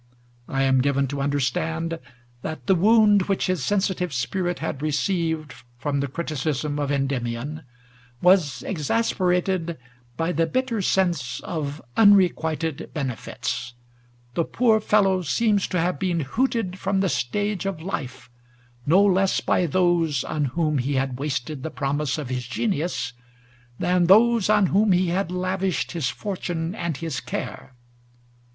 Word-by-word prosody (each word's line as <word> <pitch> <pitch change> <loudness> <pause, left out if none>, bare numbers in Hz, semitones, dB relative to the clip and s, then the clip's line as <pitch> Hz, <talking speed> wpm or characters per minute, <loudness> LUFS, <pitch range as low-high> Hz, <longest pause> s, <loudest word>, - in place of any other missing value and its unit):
I 135 0 0
am 130 -1 +4
given 140 0 +1
to 140 - -4
undei'stand 160 +4 -1 0.4
that 150 -4 -6
the - - +4
wound 205 +1 +4
which 195 - +1
his 185 -7 -1
sensitive 190 0 0
spirit 175 +8 -1
had 145 -3 -4
received 155 0 -1 0.2
from 140 +2 -1
the 140 - -1
criticism 150 -1 -2
of 145 -1 -1
Endymion 135 +1 -2 0.6
was 175 -7 +3
exasperated 180 -1 0 0.4
by 165 +2 0
the 165 0 +1
bitter 255 +1 -1
sense 175 -10 0
of 150 -2 -4
unrequited 165 -7 +3
benefits; 120 -3 -4 0.6
the 170 - +1
poor 225 +3 +2
fellow 195 -3 +3
seems 205 +5 +1
to 180 - -1
have 180 +2 0
been 180 -3 0
hooted 195 - -1
from 195 0 0
the 195 - +2
stage 205 +7 -1
of 190 -5 -3
life 150 -7 -5 0.6
no 185 +7 +6
less 195 -1 +3
by 180 - +1
those 165 -4 +2
on 150 -2 -1
whom 150 +1 0
he 135 +3 -1
had 130 -1 -1
wasted 145 0 -3
the 160 - -4
promise 145 0 -1
of 145 -5 -5
his 125 -2 -3
genius 155 - -2 0.6
than 180 +2 +2
those 225 +2 +5
on 210 -2 +5
whom 205 0 +4
he 180 0 +2
had 180 0 -1
lavished 185 -3 -1
his 160 -8 -1
fortune 175 - -3
and 170 -8 -3
his 160 -3 -3
care. 130 - -6
165 Hz, 140 wpm, -24 LUFS, 140-190 Hz, 0.6 s, no